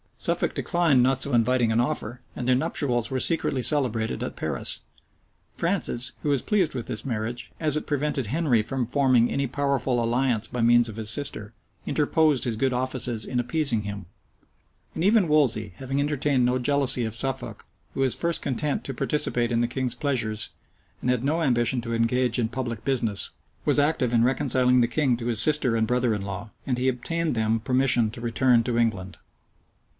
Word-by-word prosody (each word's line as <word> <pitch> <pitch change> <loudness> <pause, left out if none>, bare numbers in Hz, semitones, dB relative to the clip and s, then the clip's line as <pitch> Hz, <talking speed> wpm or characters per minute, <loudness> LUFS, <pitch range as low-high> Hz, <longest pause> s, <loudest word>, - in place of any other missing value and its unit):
Suffolk - - -1
declined 170 -7 +2
not 130 +1 +2
so 140 - -1
inviting 120 0 +2
an 110 - +1
offer; 120 -2 -2
and 125 - -5
their 130 - +4
nuptials 125 -5 +1
were 130 - -2
secretly 140 -4 +1
celebrated 115 - +1
at - - -5
Paris. - - -3 0.7
Francis, 120 +1 -1
who 150 - -2
was 140 -3 +1
pleased 190 -9 +1
with 120 - -4
this 110 - -2
marriage, 120 0 -4
as 155 -2 +1
it 155 - -3
prevented 145 -4 -1
Henry 135 -3 +1
from 125 +3 -3
forming 125 -2 +2
any 140 0 -1
powerful 135 -2 -1
alliance 120 -2 0
by 125 - -4
means 120 0 +4
of 110 - -8
his 110 -1 -2
sister,[*] 115 -4 -1 0.3
interposed 150 -2 +2
his 120 -4 -1
good 130 +3 0
offices 125 -3 -2
in 125 - -2
appeasing 125 -2 0
him: 100 -2 -6 0.9
and 160 - -2
even 205 -1 +4
Wolsey, 120 - +1
having 135 +1 -3
entertained 140 -3 +1
no 125 +1 +1
jealousy 135 -1 +3
of 110 -1 -4
Suffolk, 135 +2 -3 0.3
who - - -5
was 135 -2 +3 0.2
content 140 +2 -2
to 135 - -6
participate 125 -3 +1
in 115 0 +1
the 120 - +1
king's 125 0 -2
pleasures, 120 -6 -2 0.5
and - - -2
had 125 -1 +1
no 155 +5 0
ambition 120 -2 +1
to 115 0 -5
engage 120 +1 +1
in 115 - +1
public 120 -2 -5
business, 115 -7 0 0.3
was - - +4
active 145 -5 +1
in 115 -1 +4
reconciling 125 -1 +2
the 120 - +3
king 125 +1 +1
to 120 0 -5
his 115 -2 +1
sister 145 -6 +3
and 110 -1 +1
brother 125 -1 +1
in 105 - -3
law; 100 +2 -6 0.2
and 125 -2 0
he 130 - 0
obtained 155 +5 -1
them 110 0 0
permission 125 -1 +2
to 115 +2 -10
return 120 0 +2
to 120 0 -2
England. 100 -6 -1
125 Hz, 185 wpm, -25 LUFS, 115-140 Hz, 0.9 s, their